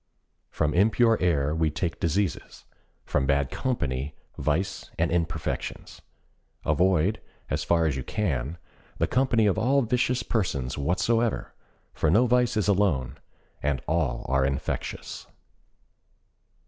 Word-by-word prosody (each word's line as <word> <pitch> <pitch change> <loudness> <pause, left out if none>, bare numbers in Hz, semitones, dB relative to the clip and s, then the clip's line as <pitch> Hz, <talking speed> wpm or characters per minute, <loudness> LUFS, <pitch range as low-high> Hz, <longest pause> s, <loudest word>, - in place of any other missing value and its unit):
From 75 -1 0
impure 115 +5 +4
air 75 -5 +2
we 80 -1 +1
take 80 +2 -3
diseases; 90 +4 -2 0.4
from 65 - 0
bad 70 -1 +1
company, 70 - -2 0.2
vice 85 +6 -1
and - - +1
imperfections. 85 -2 -3 0.6
Avoid, 90 +5 +2 0.3
as - - 0
far 85 -1 +2
as 75 -4 +1
you 65 - -3
can, 75 - -2 0.4
the - - +2
company 125 -3 +2
of 105 +1 +2
all 135 +4 +3
vicious 125 +1 +1
persons 70 - -1
whatsoever, 110 +10 0 0.4
for 80 - +1
no 110 +10 +5
vice 125 -2 +2
is 105 - +1
alone, 75 -10 +1 0.4
and 70 -2 -1
all 75 -7 0
are 65 +1 +2
infectious. 70 0 -3
85 Hz, 120 wpm, -26 LUFS, 70-110 Hz, 0.6 s, no